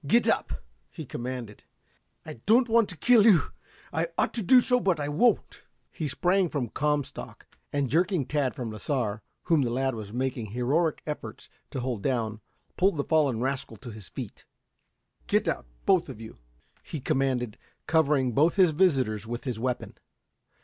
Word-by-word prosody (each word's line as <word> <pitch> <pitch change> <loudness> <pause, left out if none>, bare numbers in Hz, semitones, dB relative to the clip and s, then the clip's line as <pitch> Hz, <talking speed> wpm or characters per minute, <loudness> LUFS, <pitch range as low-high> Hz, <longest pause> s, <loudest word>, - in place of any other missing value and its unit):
"Get 235 +10 +4
up!" - - 0 0.3
he 160 - -8
commanded. 120 -4 -6 0.6
"I - - -6
don't 240 +4 +5
want 230 -2 +3
to 180 - -6
kill 235 +6 +5
you. 200 -7 +5 0.4
I - - 0
ought - - +1
to 235 - -1
do 250 +7 +7
so, 250 0 +3
but 185 -8 +1
I 145 - -2
won't." 230 +12 +1 0.3
He 155 - -3
sprang 180 +6 +1
from 130 -7 -2
Comstock, 145 0 -2 0.3
and 140 -1 0
jerking 170 - +1
Tad 140 -1 -1
from 120 -6 -4
Lasar, 110 -2 -2 0.2
whom 165 -3 +3
the 125 - 0
lad 130 +2 0
was 110 -3 -7
making 125 -1 -2
heroic 135 - 0
efforts 150 -1 -6 0.2
to 130 - -4
hold 120 -4 -3
down, 110 -4 -1 0.4
pulled 190 -2 +3
the 140 - 0
fallen 140 -8 +2
rascal 130 -3 -3
to 120 +4 -9
his 105 -3 -11
feet. - - -8 0.8
"Get - - +2
out, - - -2 0.2
both - - +3
of - - -8
you!" 110 - -10 0.4
he 155 - -6
commanded, 130 -4 -1 0.3
covering 150 -5 +2
both 155 +8 +3
his 185 -5 +5
visitors 130 - +1
with 120 +1 -5
his 125 -5 -3
weapon. 125 +1 -3
135 Hz, 170 wpm, -27 LUFS, 120-165 Hz, 0.8 s, do